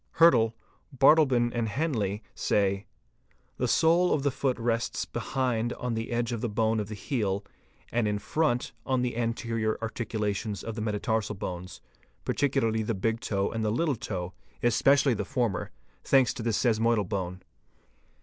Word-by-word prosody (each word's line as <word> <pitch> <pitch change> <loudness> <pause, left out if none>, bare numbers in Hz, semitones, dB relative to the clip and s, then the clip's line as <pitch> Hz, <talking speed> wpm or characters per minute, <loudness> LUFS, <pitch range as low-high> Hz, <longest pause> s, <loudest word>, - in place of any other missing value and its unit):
Hyrtl®®, 120 -10 +6 0.4
Bardeleben®™, 130 -4 +5
and 115 -2 0
Henle®®), 105 -6 -1
say 100 -1 0 0.3
:—'"' - - -39
The - - +1
sole 170 +2 +4
of 140 - +1
the 140 - +2
foot 130 -1 -1
rests 115 0 -1
behind 120 -3 -1
on 125 -1 -3
the 115 0 -3
edge 120 0 -1
of 115 -2 -3
the 120 - -1
bone 110 +1 +1
of 105 - -3
the 110 - -5
heel 100 -4 -2 0.5
and 120 -2 +1
in 105 0 0
front 125 +2 0
on 130 -2 0
the 125 -2 -1
anterior 115 -1 -1
articulations 110 -2 -3
of 115 - -4
the 110 - -5
metatarsal 105 0 -1
bones, 90 -2 -6 0.4
particularly 125 -6 +1
the 110 +1 -1
big 115 +4 0
toe 100 -5 -1
and 115 -1 -2
little 130 +8 +1
toe, 90 -5 -5 0.3
especially 130 +3 +4
the 110 - -2
former, 120 -8 -1 0.3
thanks 135 -3 +4
to - - -6
the 115 - -1
sesamoidal 115 -2 +2
bone." 95 -2 -4
115 Hz, 160 wpm, -28 LUFS, 105-125 Hz, 0.5 s, Hyrtl®®